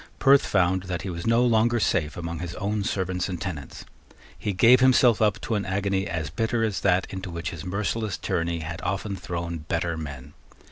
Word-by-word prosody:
Perth 140 Hz, 0 st, +5 dB
found 95 Hz, -1 st, +2 dB
that 90 Hz, 0 st, -4 dB
he 95 Hz, -, -4 dB
was 85 Hz, +2 st, -5 dB
no 115 Hz, +2 st, +4 dB
longer 120 Hz, 0 st, +3 dB
safe 75 Hz, -7 st, 0 dB
among 85 Hz, -1 st, -4 dB
his 85 Hz, +1 st, -5 dB
own 105 Hz, 0 st, -2 dB
servants 95 Hz, -2 st, -2 dB
and 90 Hz, -2 st, -4 dB
tenants. 80 Hz, -7 st, -6 dB, 0.5 s
He 105 Hz, -, -3 dB
gave 120 Hz, +7 st, +6 dB
himself 125 Hz, -3 st, +5 dB
up 105 Hz, -2 st, +2 dB
to -, -, -3 dB
an 105 Hz, -2 st, 0 dB
agony 95 Hz, 0 st, -1 dB
as 80 Hz, -2 st, -3 dB
bitter 115 Hz, +4 st, 0 dB
as 110 Hz, -3 st, 0 dB
that 95 Hz, -1 st, +2 dB
into 95 Hz, 0 st, -5 dB
which 85 Hz, 0 st, -4 dB
his 85 Hz, -3 st, -7 dB
merciless 100 Hz, +2 st, -2 dB
tyranny 85 Hz, 0 st, -2 dB
had 80 Hz, +1 st, -6 dB
often 95 Hz, +2 st, -2 dB
thrown 85 Hz, -2 st, -4 dB
better 85 Hz, +2 st, -2 dB
men. 70 Hz, -2 st, -7 dB
95 Hz, 195 wpm, -25 LUFS, 85-105 Hz, 0.5 s, gave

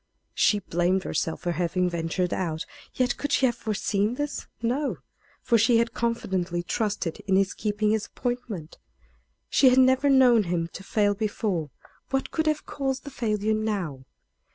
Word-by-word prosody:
She 210 Hz, -, +3 dB
blamed 185 Hz, 0 st, 0 dB
herself 160 Hz, -, -2 dB
for 175 Hz, -, -1 dB
having 175 Hz, +2 st, 0 dB
ventured 175 Hz, +1 st, -1 dB
out; 160 Hz, -4 st, -2 dB, 0.3 s
yet 255 Hz, -1 st, +1 dB
could 290 Hz, -, -3 dB
she 270 Hz, -, +3 dB
have 245 Hz, -, +2 dB
foreseen 215 Hz, 0 st, -1 dB
this? 290 Hz, +2 st, -4 dB
No; 255 Hz, +6 st, -1 dB, 0.5 s
for 235 Hz, -2 st, +3 dB
she 230 Hz, +2 st, +4 dB
had 230 Hz, 0 st, +1 dB
confidently 190 Hz, -7 st, -1 dB
trusted 205 Hz, -3 st, -2 dB
in 190 Hz, -, +3 dB
his 195 Hz, 0 st, +2 dB
keeping 210 Hz, 0 st, 0 dB
his 220 Hz, -1 st, 0 dB
appointment. 240 Hz, -10 st, -5 dB, 0.7 s
She 265 Hz, -, +5 dB
had 250 Hz, -, +3 dB
never 260 Hz, +2 st, +5 dB
known 250 Hz, -5 st, +5 dB
him 170 Hz, -1 st, -1 dB
to 195 Hz, -, -8 dB
fail 205 Hz, 0 st, +2 dB
before. 205 Hz, -6 st, -2 dB, 0.4 s
What 270 Hz, 0 st, -1 dB
could 315 Hz, -1 st, 0 dB
have 305 Hz, -1 st, 0 dB
caused 270 Hz, -2 st, -3 dB
the 285 Hz, -, -8 dB
failure 215 Hz, -3 st, 0 dB
now? 195 Hz, -11 st, -2 dB
210 Hz, 160 wpm, -26 LUFS, 180-245 Hz, 0.7 s, She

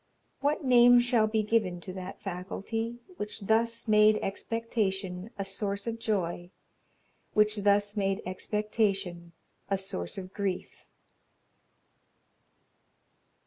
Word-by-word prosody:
What 290 Hz, +2 st, 0 dB
name 245 Hz, -1 st, +7 dB
shall 240 Hz, -3 st, +3 dB
be 215 Hz, 0 st, +1 dB
given 205 Hz, -5 st, +1 dB
To 185 Hz, -, -7 dB
that 185 Hz, -1 st, -7 dB
faculty, 210 Hz, +5 st, -4 dB, 0.2 s
Which 210 Hz, +1 st, -4 dB
thus 230 Hz, +3 st, +1 dB
made 215 Hz, 0 st, +6 dB
expectation 195 Hz, -3 st, -2 dB
A 195 Hz, -, -3 dB
source 200 Hz, +1 st, -2 dB
of 230 Hz, -1 st, -3 dB
joy, 175 Hz, -5 st, -2 dB, 0.8 s
Which 210 Hz, 0 st, +3 dB
thus 205 Hz, 0 st, +2 dB
made 195 Hz, 0 st, 0 dB
expectation 195 Hz, -3 st, -1 dB, 0.4 s
A 195 Hz, -, +2 dB
source 90 Hz, -, -4 dB
of 185 Hz, -1 st, -7 dB
grief?'" 195 Hz, -3 st, -4 dB
205 Hz, 105 wpm, -29 LUFS, 190-225 Hz, 0.8 s, name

